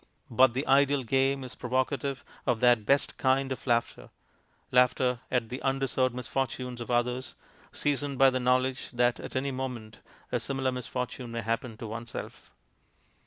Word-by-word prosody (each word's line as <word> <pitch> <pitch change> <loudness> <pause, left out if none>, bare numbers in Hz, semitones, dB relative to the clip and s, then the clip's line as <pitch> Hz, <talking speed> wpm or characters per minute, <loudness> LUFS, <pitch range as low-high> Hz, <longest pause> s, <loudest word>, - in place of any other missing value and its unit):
But 125 +1 +5
the 135 +3 -1
ideal 140 0 +4
game 135 +2 +1
is 125 - -6
provocative 130 +2 -2 0.2
of 120 -3 +2
that 120 -3 +4
best 140 +1 +2
kind 135 0 +2
of 130 - -5
laughter 120 -1 0 0.6
laughter 125 0 +3
at 120 -3 0
the 125 - -5
undeserved 135 -2 0
misfortunes 125 -1 -3
of 120 - -6
others, 125 +1 0 0.4
seasoned 145 -1 -1
by 135 0 +6
the 130 - 0
knowledge 130 +1 +1
that 120 0 +2
at - - -8
any 135 +1 0
moment 125 -4 -5 0.3
a - - +1
similar 135 -1 -1
misfortune 125 0 -4
may 115 0 -3
happen 115 +1 -2
to 115 - -7
oneself. 115 +2 -7
125 Hz, 155 wpm, -29 LUFS, 120-135 Hz, 0.6 s, by